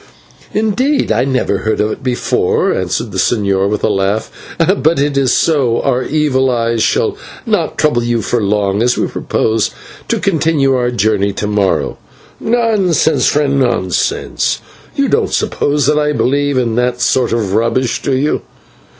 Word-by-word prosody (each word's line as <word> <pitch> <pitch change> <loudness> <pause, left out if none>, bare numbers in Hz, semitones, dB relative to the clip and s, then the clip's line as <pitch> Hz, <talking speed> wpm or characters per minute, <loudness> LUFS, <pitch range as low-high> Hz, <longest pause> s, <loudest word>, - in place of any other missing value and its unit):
"Indeed, 220 +7 0
I - - +2
never 130 -2 0
heard 110 - -1
of 105 +1 +1
it - - -6
before," 125 -2 0
answered 95 +5 -2
the 95 - -3
señor 100 -3 +1
with 105 0 -2
a - - +3
laugh; 100 +1 -1 0.5
"but 160 +2 +2
if 140 -2 +1
so, 130 -6 +2
our 130 -2 +1
evil 135 -2 +1
eyes 115 -2 0
shall - - +1 0.3
not - - -1
trouble 145 -6 +2
you 120 -2 -1
for 120 +2 0
long, 100 0 0
as 125 +1 +2
we - - +1
propose 110 -1 -1 0.4
to - - 0
continue 160 -7 +1
our 125 -1 +1
journey 105 -3 0
to 105 - -3
morrow." 105 -2 0 0.4
"Nonsense, 195 - +1
friend, 140 -2 +1
nonsense, 120 -8 0 0.4
you - - +1
don't - - +1
suppose 145 -1 0
that 150 +2 +2
I 150 0 +1
believe 140 +3 0
in 120 -3 0
that 125 0 0
sort 125 0 +1
of 110 -5 -1
rubbish, 115 +3 0
do 135 - 0
you? 145 +4 0
125 Hz, 160 wpm, -14 LUFS, 110-145 Hz, 0.5 s, a